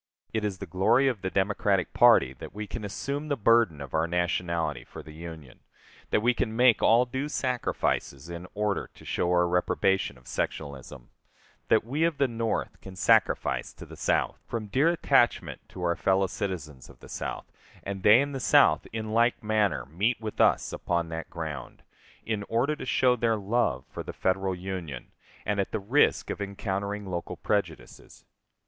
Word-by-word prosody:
It 110 -1 -1
is 100 -3 -2
the - - -6
glory 95 +10 +3
of 120 -7 -1
the 95 - -2
Democratic 100 0 +1
party 65 - +6
that - - -9
we 105 +1 -4
can 110 +2 -6
assume 140 +8 -4
the 145 -2 -1
burden 115 -8 +3
of 70 -3 -8
our 80 +1 +1
nationality 85 -1 -1
for - - -11
the 75 - -12
Union; 80 -5 -10 0.5
that 105 - +1
we 125 +1 +4
can 110 -2 -2
make 125 -1 +5
all 120 +2 +5
due 130 +4 -3
sacrifices 125 - -1
in 85 +1 -7
order 105 -1 -1
to - - -15
show 90 - -1
our 90 0 +3
reprobation 90 -2 +1
of 60 - -20
sectionalism, 65 -4 -5 0.6
that - - +4
we 140 +7 -1
of 165 -3 +1
the 140 - +3
North 115 -2 -3
can 95 -1 -10
sacrifice 110 +3 +2
to - - -11
the - - -11
South, - - 0
from 115 -2 -3
dear 135 +10 +2
attachment 170 -2 +2
to 90 - -8
our 85 -1 +1
fellow 95 0 +2
citizens 80 - -5
of - - -16
the - - -13
South, - - -5 0.4
and 95 -1 -5
they 105 +6 +7
in 145 0 -2
the 135 - -4
South 80 -9 +4
in 110 -1 -4
like 120 +2 +2
manner 105 -9 +1
meet 100 - 0
with 110 -1 -3
us - - +3
upon 85 -1 -1
that 80 0 -5
ground, 80 -4 -7 0.4
in 110 -2 -1
order 130 +7 +1
to 150 - -7
show 125 +1 +3
their 115 -2 +1
love 100 - 0
for - - -7
the - - -7
Federal 95 0 0
Union, 90 -8 -6 0.3
and 105 0 0
at 100 - -1
the 110 - -1
risk 120 +9 +2
of - - -5
encountering 100 +1 -3
local 90 -2 -4
prejudices. - - -4
100 Hz, 180 wpm, -27 LUFS, 85-115 Hz, 0.6 s, they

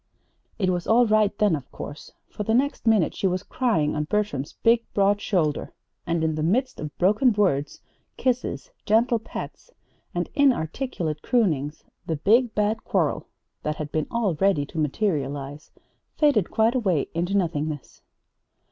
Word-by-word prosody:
It 185 -3 +1
was 175 -1 -2
all 240 +2 +5
right 215 -2 +3
then, 210 -6 +3
of 140 -4 -8
course, 145 - -8 0.2
for - - -8
the 220 +2 +1
next 275 -1 0
minute 215 -7 +3
she 195 - 0
was 185 +1 -1
crying 205 - 0
on 150 0 -1
Bertram's 160 -7 -2
big, 230 0 +4
broad 200 0 +3
shoulder; 155 -7 0 0.3
and 170 -1 0
in 160 0 +1
the 155 - -3
midst 245 - 0
of 150 -1 -7
broken 215 +8 +4
words, 165 -9 0 0.4
kisses, 255 - -1
gentle 230 +2 +3
pats, 225 - -8 0.5
and - - -1
inarticulate 210 - 0
croonings, 155 - 0 0.2
the 160 - 0
Big, 225 - +3
Bad 210 +1 0
Quarrel, - - 0 0.3
that 150 - -2
had 150 -1 -6
been 155 -1 -1
all 230 -6 0
ready 160 -2 +2
to 160 - -6
materialize, 145 -3 -2 0.5
faded 285 - +3
quite 225 +2 +2
away 190 - +1
into 175 +4 0
nothingness. 155 -5 -3
195 Hz, 155 wpm, -25 LUFS, 155-225 Hz, 0.5 s, all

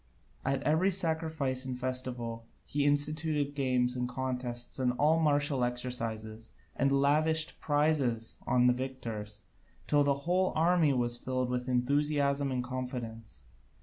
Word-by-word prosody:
At 135 +1 0
every 160 +6 +3
sacrifice 160 -7 -1
and 130 -1 -4
festival 125 -3 -3 0.2
he 145 0 -1
instituted 145 0 +1
games 125 -3 +1
and 125 -1 -2
contests 125 -1 -4
in 125 -1 +1
all 150 +5 +3
martial 145 -4 +2
exercises, 115 -3 -4 0.2
and 140 +1 +1
lavished 155 +3 +2
prizes 145 -7 0
on 125 -1 +3
the 125 - +5
victors, 115 -5 -6 0.4
till 145 -1 +3
the 140 0 0
whole 185 +2 +2
army 165 -1 +3
was 120 -2 -1
filled 130 -1 -2
with 125 0 -2
enthusiasm 140 +2 +1
and 125 -1 -1
confidence. 120 - -6
130 Hz, 130 wpm, -31 LUFS, 125-145 Hz, 0.4 s, the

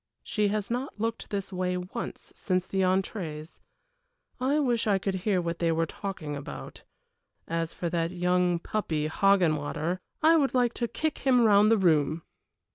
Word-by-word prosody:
She 210 -2 0
has 210 +1 -2
not 250 -1 -3
looked 225 +1 -3
this 195 -1 -4
way 180 0 -1
once 180 +6 -6
since 185 -1 -1
the 190 0 -1
entrées. 185 -4 -2 0.8
I 265 +4 +1
wish 245 -6 +1
I 200 -2 +4
could 195 +1 -2
hear 190 +1 0
what 170 -1 -3
they 170 - +1
are 165 0 +1
talking 165 -4 -5
about. 70 - -8 0.7
As 165 0 -2
for 175 - -3
that 165 -1 0
young 180 0 +1
puppy 165 -5 -2
Hoggenwater, 165 -2 +1 0.2
I 325 +1 +6
would 275 -4 +1
like 245 -2 +3
to 240 - -2
kick 310 +5 -2
him 255 -2 +4
round 210 0 +5
the 225 - +5
room! 160 -3 +2
185 Hz, 165 wpm, -28 LUFS, 165-215 Hz, 0.8 s, I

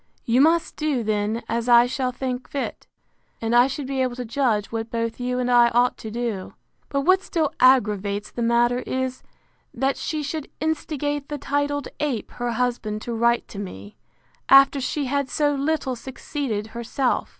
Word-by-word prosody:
You 240 +3 +3
must 330 +3 +3
do 295 -6 0
then 215 +1 -1
as 235 +1 -1
I 240 0 +8
shall 255 0 -1
think 250 0 -4
fit: 280 - -4 0.5
And 225 +1 0
I 245 +1 +7
shall 275 +1 -4
be 265 0 -2
able 255 -2 0
to 250 0 -5
judge 230 -4 0
what 225 0 -3
both 230 0 -3
you 250 0 -1
and 250 0 0
I 240 -1 +6
ought 245 +1 +4
to 220 - -7
do. 225 -4 -4 0.3
But 275 - 0
what 370 +6 +4
still 320 -6 -1
aggravates 210 -5 +3
the 240 - -5
matter 240 +1 +3
is, 260 0 -3 0.5
that 270 +3 0
she 305 -1 -3
should 295 0 -4
instigate 290 -2 -2
the 295 - -3
titled 285 +1 -1
ape 275 -8 -2
her 240 -1 -3
husband 225 -3 -2
to 235 - -4
write 235 +1 +2
to 200 - -8
me, 100 - -8 0.5
after 275 0 +7
she 285 +2 -1
had 280 0 -1
so 290 -1 +1
little 280 -2 -1
succeeded 255 -3 -4
herself. 235 +2 -1
250 Hz, 175 wpm, -23 LUFS, 230-280 Hz, 0.5 s, I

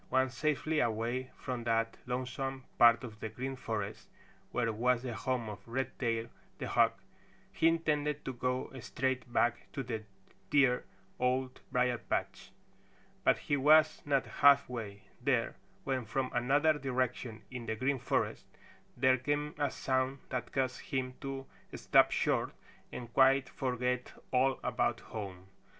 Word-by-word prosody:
Once 130 0 +2
safely 155 +2 0
away 120 +2 0
from 125 -2 -4
that 115 0 +1
lonesome 130 +1 -3 0.2
part 120 +1 +7
of 110 -4 -8
the 110 - -4
Green 130 +4 -4
Forest 110 -5 -4 0.4
where 115 -2 0
was 125 +2 +2
the 125 -2 -3
home 120 +1 -2
of 105 -1 -6
Redtail 120 -2 -1 0.3
the - - -4
Hawk, - - +3 0.5
he 165 - +3
intended 150 -3 +1
to 130 - -3
go 125 +1 -2
straight 130 +1 -2
back 120 0 +1
to 135 - -3
the 115 -3 -4 0.5
dear 130 -4 +4 0.3
Old 130 +1 0
Briar 125 -2 +2
patch. - - -3 0.7
But - - +4
he 145 - -1
was 155 +3 +5
not 140 -2 +1 0.2
halfway 125 -8 +4 0.2
there 125 -3 +1 0.3
when 130 -3 -1
from 130 +4 -1
another 140 +6 +3
direction 125 -3 -2
in 125 -2 -6
the 110 - -1
Green 130 +4 0
Forest - - -1 0.5
there 130 0 +4
came 145 +3 -1
a 145 -1 +2
sound 130 +1 -1
that 125 -2 -3
caused 130 -1 -1
him 130 -2 -2
to 135 -1 -5 0.3
stop - - +5
short - - 0 0.4
and 120 -1 -7
quite 135 0 +5
forget 125 -1 -2 0.2
all 130 +1 +3
about - - 0
home. 95 -4 -7
130 Hz, 140 wpm, -33 LUFS, 120-135 Hz, 0.7 s, part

